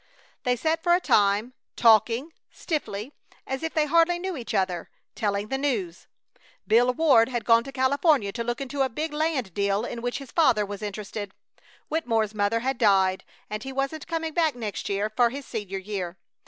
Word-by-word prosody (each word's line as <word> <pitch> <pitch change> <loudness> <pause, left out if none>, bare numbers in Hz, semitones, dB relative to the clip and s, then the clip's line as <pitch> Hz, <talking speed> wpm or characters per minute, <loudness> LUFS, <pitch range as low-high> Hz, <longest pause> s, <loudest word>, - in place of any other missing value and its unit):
They 250 0 +3
sat 320 +6 0
for 345 0 +4
a - - +2
time, 210 - +2 0.2
talking, 230 +6 +4 0.2
stiffly, 275 - -4 0.3
as 265 0 -4
if 325 0 -4
they 310 -1 +3
hardly 335 +3 +3
knew 375 +2 -3
one 265 -7 -6
another, 185 -4 -1 0.2
telling 205 0 -2
the 270 - -1
news. 210 -12 -2 0.6
Bill 240 +3 +4
Ward 260 -5 +4
had 240 -4 -3
gone 230 +1 +5
to 275 - -7
California 270 - +2
to 235 +2 -4
look 240 0 -2
into 275 +1 -3
a 265 - +2
big 300 +6 -4
land 300 - -1
deal 200 +3 0
in 235 - -5
which 245 +1 -2
his 275 -3 -10
father 230 -11 +3
was 200 +1 -7
interested. 205 -1 -6 0.5
Wittemore's 225 -9 0
mother 210 +2 +1
had 265 0 -2
died 190 -4 +3 0.2
and 215 0 -5
he 270 - -6
wasn't 275 +3 -3
coming 325 -1 -3
back 320 -4 +2
next 220 -4 -5
year 200 +1 0
for 235 +2 +2
his 275 +2 -7
senior 205 -4 -5
year. 190 -2 -5
240 Hz, 185 wpm, -26 LUFS, 205-285 Hz, 0.6 s, gone